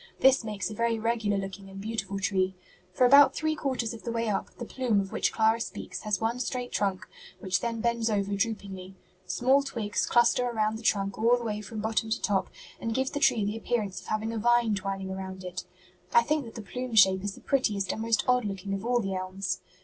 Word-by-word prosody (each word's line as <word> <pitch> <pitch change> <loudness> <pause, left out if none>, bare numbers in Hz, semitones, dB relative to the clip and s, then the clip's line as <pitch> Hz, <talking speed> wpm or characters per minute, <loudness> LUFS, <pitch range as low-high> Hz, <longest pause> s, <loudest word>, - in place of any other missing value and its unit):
This 265 -1 +5
makes 210 -3 -3
a 215 - -6
very 230 +1 0
regular 220 -2 0
looking 195 0 -6
and 195 0 -9
beautiful 200 -2 -3
tree. 190 -1 0 0.4
For 250 +7 +3
about 275 +1 +7
three 315 -1 0
quarters 260 -6 -2
of 225 - -9
the 235 - -4
way 230 -1 -1
up, 200 - -1
the 240 - -5
'plume' 240 -4 0
of 195 -1 -3
which - - +1
Clara 220 +1 +2
speaks - - -6
has 210 -3 -1
one 230 +2 -1
straight 250 0 -3
trunk, 195 -2 -1 0.3
which 185 -1 0
then 230 -1 -3
bends 235 -1 +1
over 200 -2 0
droopingly. 195 -3 -3 0.3
Small 260 +9 +3
twigs 230 -7 -2
cluster 240 +1 +4
around 220 -2 0
the - - -11
trunk 200 -3 0
all 235 +2 +4
the 240 - -6
way 210 -2 -3
from 210 +1 -6
bottom 220 0 0
to 220 - 0
top 195 -3 0 0.3
and 225 -1 -3
give 265 0 0
the 290 - -2
tree 245 -8 +3
the 205 +1 -2
appearance 220 -4 -2
of - - -15
having 215 +1 -1
a 225 - -2
vine 240 0 +3
twining 195 -1 -3
about 190 0 -6
it. 180 0 -6 0.5
I 235 - +7
think 300 +2 0
that 225 - -11
the 225 - -6
plume 250 +3 -5
shape 190 -2 +6
is 205 -1 -3
the - - -14
prettiest 210 -8 0
and 220 - -4
most 225 0 +1
odd 250 0 +3
looking 195 -1 -4
of 195 - -3
all 240 +1 +2
the 195 -2 -3
elms. 185 0 -3
220 Hz, 225 wpm, -28 LUFS, 195-235 Hz, 0.5 s, about